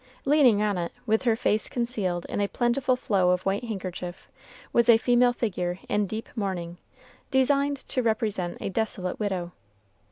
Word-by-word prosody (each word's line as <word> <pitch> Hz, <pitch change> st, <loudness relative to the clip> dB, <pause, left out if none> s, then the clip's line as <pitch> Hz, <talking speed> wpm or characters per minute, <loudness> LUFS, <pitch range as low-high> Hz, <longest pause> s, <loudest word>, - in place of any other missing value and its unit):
Leaning 270 Hz, -8 st, +5 dB
on 205 Hz, -3 st, 0 dB
it, 170 Hz, -1 st, -3 dB
with 220 Hz, -1 st, +2 dB
her 230 Hz, -2 st, +4 dB
face 215 Hz, -1 st, +1 dB
concealed 210 Hz, -8 st, -1 dB
in -, -, -3 dB
a 200 Hz, -, +1 dB
plentiful 245 Hz, +5 st, +1 dB
flow 200 Hz, -8 st, +1 dB
of 180 Hz, 0 st, +1 dB
white 195 Hz, +4 st, 0 dB
handkerchief, 185 Hz, -4 st, -6 dB, 0.5 s
was 235 Hz, 0 st, +3 dB
a 230 Hz, -, +9 dB
female 245 Hz, +1 st, +3 dB
figure 180 Hz, -7 st, -2 dB
in 205 Hz, -1 st, 0 dB
deep 220 Hz, +3 st, -5 dB
mourning, 180 Hz, -5 st, -3 dB, 0.5 s
designed 280 Hz, +2 st, +2 dB
to 260 Hz, -1 st, -3 dB
represent 220 Hz, -6 st, -1 dB
the -, -, -5 dB
desolate 190 Hz, -3 st, -2 dB
widow. 190 Hz, -5 st, -2 dB
215 Hz, 160 wpm, -26 LUFS, 185-245 Hz, 0.5 s, a